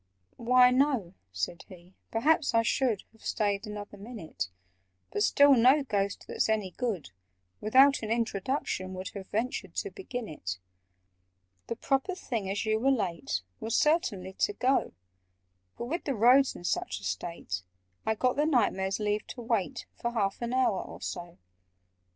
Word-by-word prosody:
"Why, 250 Hz, +1 st, +6 dB
no," 255 Hz, -9 st, +2 dB, 0.2 s
said 90 Hz, -, -3 dB
he; 180 Hz, 0 st, -14 dB, 0.2 s
"perhaps 280 Hz, +3 st, +2 dB
I 230 Hz, -, +5 dB
should 235 Hz, -3 st, +1 dB
Have 225 Hz, -, -24 dB
stayed 205 Hz, 0 st, 0 dB
another 205 Hz, -1 st, -7 dB
minute— 180 Hz, -, -6 dB, 0.6 s
But 205 Hz, -, -1 dB
still 285 Hz, +6 st, +6 dB
no 260 Hz, +4 st, +5 dB
Ghost, 200 Hz, -5 st, -1 dB
that's -, -, 0 dB
any 210 Hz, -4 st, 0 dB
good, 200 Hz, -, -3 dB, 0.5 s
Without 270 Hz, +6 st, +5 dB
an 215 Hz, -, -4 dB
introduction 220 Hz, -3 st, -1 dB
would 185 Hz, 0 st, -5 dB
Have 195 Hz, -2 st, -8 dB
ventured 235 Hz, +4 st, -2 dB
to 405 Hz, -, -2 dB
begin 245 Hz, -, -6 dB
it. 95 Hz, -, -5 dB, 1.1 s
"The 230 Hz, -, -2 dB
proper 275 Hz, -, 0 dB
thing, 230 Hz, -, -3 dB
as 200 Hz, +3 st, -1 dB
you 220 Hz, 0 st, +2 dB
were 265 Hz, +4 st, +3 dB
late, 175 Hz, -, -1 dB, 0.2 s
Was 225 Hz, +1 st, -2 dB
certainly 205 Hz, -, +1 dB
to 415 Hz, -, +2 dB
go: 265 Hz, -6 st, +1 dB, 0.8 s
But, -, -, -4 dB
with 330 Hz, +9 st, -3 dB
the 275 Hz, -, 0 dB
roads 250 Hz, +5 st, +5 dB
in -, -, -10 dB
such 95 Hz, -, -1 dB
a -, -, -16 dB
state, 95 Hz, -, -3 dB, 0.4 s
I 220 Hz, -, +1 dB
got 250 Hz, +4 st, +1 dB
the 295 Hz, +1 st, +3 dB
Knight 245 Hz, -9 st, +3 dB
Mayor's 190 Hz, +1 st, -2 dB
leave 210 Hz, 0 st, -1 dB
to 245 Hz, -, -7 dB
wait 230 Hz, +1 st, -1 dB
For 235 Hz, 0 st, -3 dB
half 200 Hz, -3 st, 0 dB
an 235 Hz, 0 st, -2 dB
hour 255 Hz, -6 st, +2 dB
or -, -, -9 dB
so." 175 Hz, -1 st, -6 dB
220 Hz, 165 wpm, -29 LUFS, 190-255 Hz, 1.1 s, Why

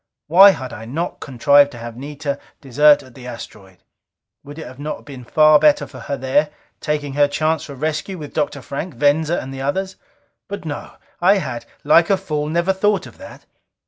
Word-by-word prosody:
Why 190 Hz, +6 st, +8 dB
had 130 Hz, -9 st, -3 dB
I 110 Hz, -, -8 dB
not 160 Hz, +9 st, -4 dB
contrived 140 Hz, +2 st, +4 dB
to -, -, -9 dB
have 115 Hz, 0 st, -8 dB
Anita 140 Hz, +2 st, -5 dB, 0.2 s
desert 145 Hz, +2 st, +4 dB
at 130 Hz, -, -17 dB
the 125 Hz, -1 st, -11 dB
asteroid? 95 Hz, -6 st, -11 dB, 0.6 s
Would 145 Hz, +2 st, -11 dB
it 130 Hz, -5 st, -9 dB
not 150 Hz, +1 st, -4 dB
have -, -, -17 dB
been 135 Hz, -4 st, -10 dB
far 155 Hz, +4 st, +5 dB
better 150 Hz, -1 st, +4 dB
for -, -, -12 dB
her 140 Hz, -, -4 dB
there, 140 Hz, +3 st, +1 dB, 0.3 s
taking 150 Hz, -2 st, -3 dB
her 145 Hz, 0 st, +3 dB
chance 155 Hz, +1 st, -1 dB
for 140 Hz, -, -9 dB
rescue 155 Hz, +6 st, -3 dB
with 150 Hz, -3 st, -9 dB
Dr. 145 Hz, -3 st, -2 dB
Frank, 160 Hz, +5 st, -6 dB
Venza 150 Hz, +3 st, +2 dB
and 135 Hz, +1 st, -7 dB
the 135 Hz, -, -6 dB
others? 190 Hz, +8 st, -2 dB, 0.5 s
But 200 Hz, -3 st, -7 dB
no! 145 Hz, -2 st, -6 dB, 0.3 s
I 195 Hz, +3 st, +5 dB
had, 125 Hz, -10 st, -5 dB, 0.2 s
like 165 Hz, +3 st, +4 dB
a 195 Hz, -, +3 dB
fool, 150 Hz, -5 st, -3 dB
never 170 Hz, +4 st, +1 dB
thought 195 Hz, -1 st, +1 dB
of -, -, -14 dB
that! -, -, -12 dB
145 Hz, 195 wpm, -20 LUFS, 135-160 Hz, 0.6 s, Why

